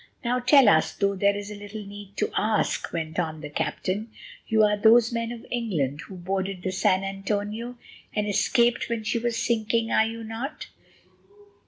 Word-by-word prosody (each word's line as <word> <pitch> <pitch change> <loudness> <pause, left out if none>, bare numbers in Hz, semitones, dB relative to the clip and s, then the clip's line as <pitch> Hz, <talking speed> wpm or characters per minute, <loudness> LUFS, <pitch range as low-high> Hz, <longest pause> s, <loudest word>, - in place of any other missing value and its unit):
"Now 250 +1 +1
tell 255 0 +6
us, 160 -6 +4
though 200 0 +1
there 200 +1 +2
is 205 0 -6
little 205 0 -8
need 200 0 -11
to - - 0
ask," 215 0 0
went 160 -1 -3
on 160 -3 -2
the 150 -1 -7
captain, 200 +8 -2 0.4
"you 220 -1 +4
are 210 0 +4
those 225 +2 +5
men 230 0 -2
of 235 -1 -8
England 165 - -1
who 190 - -9
boarded 190 +1 -3
the 185 - -1
San 185 0 +2
Antonio 205 +4 -3 0.4
and 210 -1 0
escaped 235 +4 +2
when 230 -2 -2
she 225 +2 0
was 235 0 -1
sinking, 225 0 0
are 220 - +4
you 230 0 -6
not?" 225 +6 -5
210 Hz, 175 wpm, -26 LUFS, 195-230 Hz, 0.4 s, tell